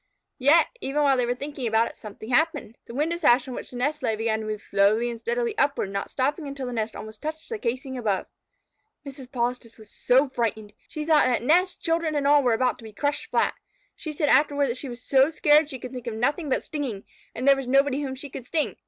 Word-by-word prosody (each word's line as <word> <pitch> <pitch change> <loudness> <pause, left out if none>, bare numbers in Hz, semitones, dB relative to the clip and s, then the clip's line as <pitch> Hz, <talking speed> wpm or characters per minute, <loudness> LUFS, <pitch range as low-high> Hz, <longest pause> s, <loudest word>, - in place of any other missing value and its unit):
Yet, 295 +6 +6 0.2
even 295 +2 0
while 275 -2 +4
they 250 -2 0
were 245 - 0
thinking 280 -1 -4
about 225 +1 +3
it, - - -10
something 215 +2 -9
else 245 - +6
happened. 320 -8 -3
The 235 - -9
window 320 +5 0
sash 260 -6 +4
on 255 - -5
which - - -7
the 250 - -8
nest 295 +4 -1
lay 220 - 0
began 220 0 -1
to 220 - -5
move 215 -1 -4
slowly 210 +4 +2
and 230 - -7
steadily 470 - -1
upward, 280 -8 +1
not 200 0 -3
stopping 285 +4 -1
until 275 -1 -5
the 245 - -4
nest 225 -1 -2
almost 215 0 -9
touched 315 +1 -5
the 455 -2 -5
casing 260 - -3
above. 205 -5 -1 0.8
Mrs. 270 -2 -10
Polistes 240 -2 -3
was 215 -2 -16
so 260 +3 +3
frightened! 220 -4 -3
She 305 -1 -5
thought 310 -4 +4
that 245 -2 0
nest, 355 +7 +2
children, 330 -2 0
and 285 -1 0
all 290 +1 +6
were 245 -3 +2
about 250 +2 0
to - - -13
be 220 -1 -10
crushed 285 +8 -2
flat. - - +1 0.4
She 315 - -6
said 300 0 -1
afterward 285 -2 +3
that 240 - -3
she 270 - -6
was 240 0 -9
so 270 +1 +4
scared 300 -1 +4
she 265 - -6
could 250 0 -8
think 250 -2 -8
of 230 - -3
nothing 285 +7 0
but 260 - 0
stinging, 270 -10 -4 0.3
and 255 +4 -3
there 275 - +8
was 270 -2 -5
nobody 275 +2 +3
whom 265 -2 -4
she 275 +1 -8
could 250 - -8
sting. 310 0 -1
265 Hz, 245 wpm, -25 LUFS, 235-295 Hz, 0.8 s, there